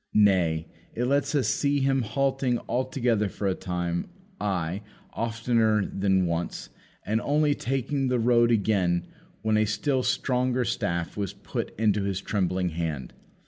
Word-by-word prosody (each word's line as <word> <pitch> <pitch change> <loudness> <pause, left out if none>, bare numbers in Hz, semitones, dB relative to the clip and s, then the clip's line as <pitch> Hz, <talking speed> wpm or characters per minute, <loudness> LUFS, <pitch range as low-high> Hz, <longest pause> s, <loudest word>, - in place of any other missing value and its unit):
Nay, 90 -6 +3 0.3
it 120 - 0
lets 140 +2 +1
us 140 - +2
see 145 0 +1
Him 135 0 +2
halting 130 +2 0
altogether 125 -5 0
for 100 - -3
a 95 - +2
time; 90 -2 -3 0.3
ay, 95 -1 -1 0.3
oftener 115 -2 +1
than 95 -1 +1
once; 85 0 -3 0.4
and 110 +2 0
only 150 0 +2
taking 135 +1 -1
the 125 0 +1
road 120 0 +4
again, 100 -6 +2 0.4
when 110 -1 +2
a 110 - +3
still 130 +6 0
stronger 125 -1 +1
staff 85 -5 -2
was 100 -3 -3
put - - -5
into 105 -2 +2
his 100 -1 -1
trembling 95 -2 0
hand. 80 -6 -4
110 Hz, 140 wpm, -27 LUFS, 95-125 Hz, 0.4 s, road